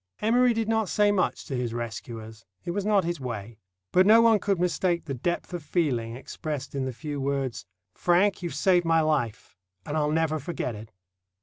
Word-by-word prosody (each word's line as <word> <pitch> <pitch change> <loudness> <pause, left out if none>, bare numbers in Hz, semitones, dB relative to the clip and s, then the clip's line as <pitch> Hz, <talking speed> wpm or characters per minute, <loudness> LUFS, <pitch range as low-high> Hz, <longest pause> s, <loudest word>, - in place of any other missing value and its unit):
Emory 245 +3 +4
did 225 -1 -1
not 220 -3 +1
say 205 -1 +3
much 195 -3 0
to 140 - -4
his 120 -2 -2
rescuers. 115 -1 -6 0.2
It - - -2
was 200 +3 -2
not 205 -3 +4
his 170 -1 -2
way. 115 -4 -6 0.3
But 185 +2 +5
no 220 +2 +8
one 230 -2 +5
could 195 -3 0
mistake 175 0 0
the 140 - -4
depth 175 +8 -3
of 175 - -3
feeling 135 -8 -1
expressed 140 +2 -6
in 135 -1 -2
the 130 - -2
few 140 +4 -5
words,— 135 -8 -2 0.3
"Frank, 185 +3 +2
you've 170 -5 -4
saved 175 +3 +3
my 165 -1 +3
life, 140 -12 -1 0.3
and 145 - -4
I'll 150 -1 +1
never 160 0 +1
forget 145 -4 -3
it." 110 +1 -10
155 Hz, 195 wpm, -27 LUFS, 125-185 Hz, 0.3 s, no